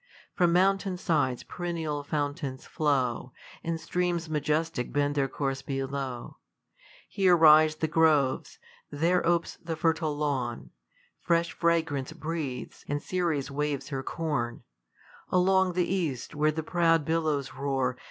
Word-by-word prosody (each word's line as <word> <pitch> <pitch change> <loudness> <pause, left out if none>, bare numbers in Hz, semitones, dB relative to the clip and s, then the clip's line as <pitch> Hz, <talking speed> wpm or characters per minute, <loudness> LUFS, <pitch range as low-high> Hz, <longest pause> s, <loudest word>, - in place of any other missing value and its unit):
From 175 -2 +3
mountain 190 +1 +2
sides 150 -9 0
perennial 165 -4 -3
fountains 145 -3 -3
flow, 130 -5 0 0.3
And 165 -1 -2
streams 175 -2 -1
majestic 150 -3 -1
bead 145 0 +1
their 140 -2 +1
course 135 -1 -3
below. 135 -2 -4 0.7
Here 185 -3 +3
rise 155 -1 +7
the 160 +1 -1
groves; 155 -4 +2 0.3
there 170 +5 +1
opes 170 0 0
the 165 -1 -5
hHUe 160 -2 0
lawn, 135 -5 -2 0.5
Fresh 170 -1 +1
fragrance 160 -5 0
breathes, 155 -5 -5
and 145 +1 -1
Ceres 160 -5 -1
wn/es 145 -1 -2
her 135 -2 -3
corn 135 -6 -3 0.7
Along 185 0 +3
the 180 0 +1
east, 165 -10 -2
where 150 +1 +2
the 160 +1 -4
prouJ 165 -2 +2
billows 155 -4 0
roar. 135 -2 -1
155 Hz, 125 wpm, -28 LUFS, 140-170 Hz, 0.7 s, rise